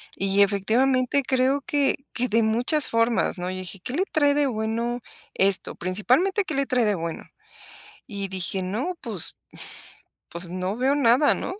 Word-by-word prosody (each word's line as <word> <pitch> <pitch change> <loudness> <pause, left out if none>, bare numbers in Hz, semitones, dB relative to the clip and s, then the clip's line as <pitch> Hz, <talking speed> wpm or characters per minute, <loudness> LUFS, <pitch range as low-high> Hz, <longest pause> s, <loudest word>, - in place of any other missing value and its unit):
Y 195 +1 +2
efectivamente 250 +7 +2
creo 265 +2 +1
que 285 -1 +1 0.2
que 250 +1 -1
de 230 +1 +2
muchas 245 +7 +2
formas, 230 -3 +1
¿no? 180 +1 -3
Y 185 - -4
dije: 185 +1 -7
"¿Qué 250 - -5
le 360 +6 +1
trae 290 -3 +3
de 290 -1 +2
bueno 230 +1 -2 0.3
esto? 195 0 +3
Principalmente, 255 - +1
¿qué 310 - -3
le 275 0 +1
trae 250 -2 +1
de 210 -1 +1
bueno?" 165 -2 -5 0.8
Y 200 -2 -4
dije: 190 0 -2
"No, 230 - -3
pues, 210 -8 0 0.9
pues, 170 +1 -5
no 185 +3 -3
veo 260 +3 +1
nada, 270 +1 +4
¿no? - - -5
230 Hz, 165 wpm, -24 LUFS, 195-270 Hz, 0.9 s, nada